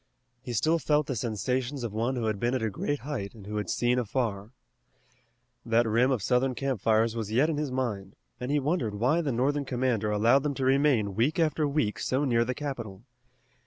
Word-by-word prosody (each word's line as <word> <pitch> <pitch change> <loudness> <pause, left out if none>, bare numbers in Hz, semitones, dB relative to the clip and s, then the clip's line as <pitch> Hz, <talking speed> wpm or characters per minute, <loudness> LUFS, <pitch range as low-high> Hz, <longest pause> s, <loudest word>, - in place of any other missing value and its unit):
He 125 - -6
still 160 +10 +2
felt 150 -1 +2
the 135 - -3
sensations 125 +5 -2
of 115 -3 -4
one 115 +4 -1
who 120 -2 -2
had 110 -2 -1
been 120 +3 0
at 125 - -1
a 110 - 0
great 145 +8 -2
height 125 -8 -5
and 105 -3 -12
who 105 +1 -4
had 105 -4 -3
seen 120 +1 +1
afar. 110 -3 -2 1.1
That 115 0 +2
rim 120 +4 +3
of 125 -7 0
Southern 125 +2 +1
campfires 115 -4 +1
was 110 -2 -4
yet 140 +8 +3
in 150 - -2
his 150 -3 -2
mind, 105 -7 -3 0.2
and 125 +1 -4
he 145 +1 +2
wondered 135 - -1
why 125 +11 +2
the 145 -4 -1
Northern 140 +4 +1
commander 125 -5 0
allowed 115 +6 +4
them 145 -1 -2
to 130 - -2
remain 130 -7 +3
week 120 +10 +1
after 155 -2 +1
week 115 -8 -1
so 130 +6 0
near 115 -3 +3
the 125 +2 -3
capital. 120 -9 -6
125 Hz, 205 wpm, -28 LUFS, 110-140 Hz, 1.1 s, allowed